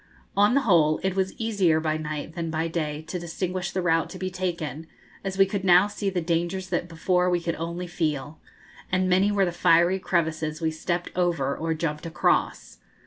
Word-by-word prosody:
On 205 +5 +4
the 280 - +4
whole 160 - +3
it 190 -1 0
was 190 -1 -1
easier 200 -8 +2
by 155 -1 0
night 155 0 -5
than 165 -1 -3
by 160 +1 -1
day 155 -2 -3
to 180 +3 -5
distinguish 180 +2 -3
the 185 -1 -2
route 165 -1 +2
to 185 - -8
be 185 0 -3
taken, 170 -5 -4 0.4
as 190 -1 -4
we 195 - +6
could 195 0 -3
now 180 0 +6
see 205 -1 -3
the 185 -2 -1
dangers 175 +3 -1
that 175 -1 -1
before 180 +2 +1
we 175 -1 +2
could 170 0 -2
only 170 +2 -4
feel; 155 -3 -3 0.5
and 185 0 +2
many 190 +3 +3
were 200 -1 +3
the 175 - -1
fiery 175 +2 +3
crevices 160 -3 -1
we 160 -1 0
stepped 175 +2 -3
over 165 -7 0
or 165 0 -2
jumped 155 0 -3
across. 160 - 0
175 Hz, 195 wpm, -25 LUFS, 160-185 Hz, 0.5 s, we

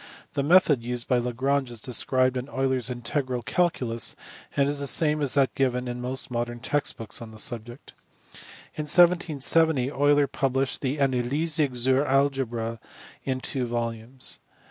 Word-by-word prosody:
The 140 - 0
method 150 -3 +4
used 120 0 -4
by 125 - +2
Lagrange 130 +3 -1
is 120 -2 -7
described 130 +2 +1
in 125 +2 -4
Euler 135 -1 0
s 125 -2 -3
integral 125 0 -2
calculus, 125 -9 0 0.4
and 140 0 +3
is 145 0 +1
the 140 - 0
same 150 0 +3
as 140 -3 0
that 135 -2 +3
given 125 -2 0
in 125 0 -5
most 130 +1 -1
modern 120 0 -3
text 145 +4 -1
books 115 +1 -5
on 115 - -8
the 110 - -13
subject. 120 +3 -5 0.8
In 155 - -4
1770 160 -5 +4
Euler 145 0 +3
published 135 -1 -1
the 135 +1 -1
Anleitung 140 +2 0
zur 130 +3 +2
Algebra 130 -5 0 0.5
in 130 -1 -2
two 130 -1 -2
volumes. 115 +2 -4
130 Hz, 155 wpm, -26 LUFS, 120-140 Hz, 0.8 s, method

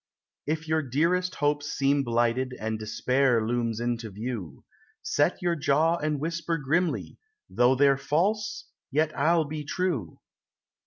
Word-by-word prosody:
If 160 +1 -2
your 160 0 +2
dearest 170 +7 0
hopes 145 0 0
seem 140 +1 +2
blighted 120 +2 0
and 110 0 -3
despair 120 +2 +1
looms 115 -1 -1
into 120 -1 -2
view, 105 - -6 0.4
Set - - +1
your 175 -1 +1
jaw 155 +3 +2
and 150 -2 -1
whisper 165 +2 -2
grimly, 165 +5 -1 0.3
"Though 125 +2 +4
they're 140 0 +4
false, 200 +10 0 0.2
yet 155 +2 0
I'll 160 +3 +3
be 150 +1 -5
true." 145 - -2
140 Hz, 135 wpm, -27 LUFS, 120-160 Hz, 0.4 s, Though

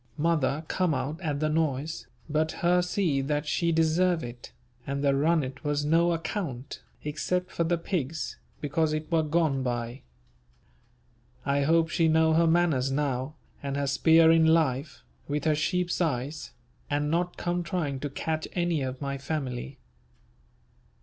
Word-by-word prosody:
Mother 155 -1 +1
come 180 -4 +1
out 140 +7 -3
at 150 -4 -2
the 155 - +1
noise, 155 -1 -1 0.2
but 155 +1 0
her 180 +1 +4
see 180 -6 0
that 145 +2 -1
she 170 +3 +1
deserve 165 +2 +2
it, 120 0 -8 0.4
and 140 +1 -2
the 140 -1 +3
runnet 140 -2 +1
was 145 -1 0
no 165 +3 +3
account, 160 - -4 0.2
except 180 +5 -2
for 170 - 0
the 170 +1 +1
pigs, 160 -3 -3 0.3
because 155 +2 0
it 155 +2 -4
were 165 -1 +4
gone 155 -3 +1
by. 120 0 -3 1.4
I 140 0 +2
hope 165 +3 +3
she 165 0 +2
know 160 0 +4
her 165 +1 +4
manners 160 -6 +2
now 135 0 -1 0.3
and 140 0 -3
her 140 - 0
spear 160 +4 +5
in 165 -1 +5
life 155 -3 +1 0.2
with 145 0 -2
her 155 - +4
sheep's 180 +4 0
eyes, 145 -1 -2 0.4
and 145 +1 0
not 175 +1 0
come 175 0 -1
trying 160 -6 -2
to 145 - -3
catch 155 +3 -3
any 175 -4 +1
of 130 0 -4
my 140 0 -3
family. 135 -2 -4
155 Hz, 155 wpm, -28 LUFS, 140-165 Hz, 1.4 s, spear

